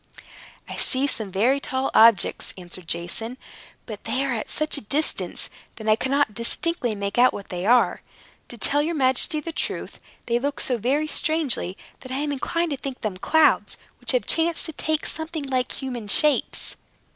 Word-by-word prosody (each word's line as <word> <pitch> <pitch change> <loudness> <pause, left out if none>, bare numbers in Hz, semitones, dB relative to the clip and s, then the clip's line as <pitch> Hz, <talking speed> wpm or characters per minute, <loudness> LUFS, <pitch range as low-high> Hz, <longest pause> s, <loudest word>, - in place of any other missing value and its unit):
"I - - -6
see 265 +1 +2
some 220 -8 -2
very 235 +9 +2
tall 265 -1 -2
objects," 225 -2 +4
answered 180 -1 -7
Jason; 180 +9 -2 0.5
"but - - -9
they 270 +1 -1
are 270 - -1
at 220 - -4
such 305 0 +1
a 285 - -2
distance 285 +8 +1 0.3
that 220 - -8
I 215 - +5
cannot 265 -1 0
distinctly 240 - 0
make 200 +2 -3
out 250 +1 +5
what 200 - -8
they 180 +2 -4
are. 245 +1 +3 0.5
To 240 - -10
tell 290 +5 +2
your 330 +3 -2
majesty 265 +3 +2
the 330 +3 -6
truth, - - -4 0.3
they 235 0 +1
look 285 +2 -3
so 250 -3 0
very 275 +7 +1
strangely 305 - 0 0.2
that 260 - -11
I 260 - -2
am 290 +1 -1
inclined 335 +4 -2
to 280 - -2
think 265 -1 -7
them 210 -5 -3
clouds, 315 +11 +2 0.2
which - - -1
have - - +1
chanced 330 0 +2
to 320 - +1
take 310 +1 -2
something 320 -1 -4
like 255 -2 -1
human 245 -5 -5
shapes." 300 +8 +3
260 Hz, 180 wpm, -23 LUFS, 225-300 Hz, 0.5 s, I